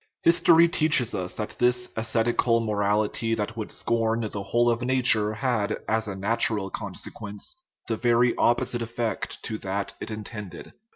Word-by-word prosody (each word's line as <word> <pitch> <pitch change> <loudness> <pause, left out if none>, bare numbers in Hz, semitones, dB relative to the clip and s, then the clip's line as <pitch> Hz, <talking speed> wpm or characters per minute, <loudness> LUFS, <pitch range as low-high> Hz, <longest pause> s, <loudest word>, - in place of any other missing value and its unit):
History 170 0 +6
teaches 155 -8 +3
us 90 -1 -3
that 105 - -5
this 125 0 +2
ascetical 115 +1 +1
morality 105 +1 0
that 105 0 -3
would 110 -2 -5
scorn 115 0 0
the 100 - -4
whole 120 +4 +2
of 115 +1 -2
nature 125 -4 +3
had, 110 -4 -1
as 110 0 0
a 100 - -4
natural 100 0 0
con - - -6
sequence, 105 - -7 0.3
the 115 - -1
very 120 0 +3
opposite 120 0 +1
effect 115 0 -4
to 110 -1 -4
that 100 +1 -3
it - - -6
intended. 105 -2 -8
115 Hz, 155 wpm, -26 LUFS, 105-120 Hz, 0.3 s, History